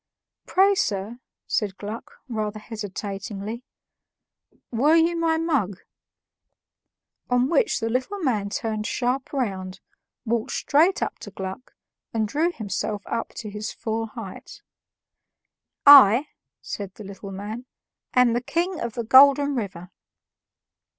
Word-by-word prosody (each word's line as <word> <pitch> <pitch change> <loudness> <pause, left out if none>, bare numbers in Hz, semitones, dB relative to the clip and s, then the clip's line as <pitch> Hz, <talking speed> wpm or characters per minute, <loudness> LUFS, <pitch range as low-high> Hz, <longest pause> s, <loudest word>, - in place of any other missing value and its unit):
"Pray, 390 +2 +4
sir," 210 - -2 0.3
said 205 -3 -1
Gluck, 210 +3 -7
rather 215 -3 -3
hesitatingly, 210 +1 -6 1.1
"were 280 +7 +4
you 335 +1 +3
my 330 -1 +1
mug?" 275 - -1 1.5
On 245 +1 +3
which 435 - +2
the 225 - -2
little 255 - -1
man 230 - -1
turned 220 -3 -3
sharp 255 +1 -1
round, 190 -8 -3 0.5
walked 230 -1 -1
straight 330 +7 +2
up - - -4
to - - -9
Gluck, 190 +5 -7 0.4
and 220 -1 +1
drew 310 +9 +1
himself 210 - -3
up 230 0 -4
to 210 -2 -6
his 210 +2 -5
full 225 0 -3
height. 215 -4 -10 1.2
"I," 275 -1 +9 0.3
said 200 -2 -6
the 215 - -10
little 200 0 -9
man, 210 +6 -6 0.5
"am 250 -2 +5
the 240 - 0
King 340 +7 -1
of 235 -2 -3
the 235 - -3
Golden 280 +4 +6
River." 190 -7 -5
230 Hz, 125 wpm, -24 LUFS, 205-275 Hz, 1.5 s, I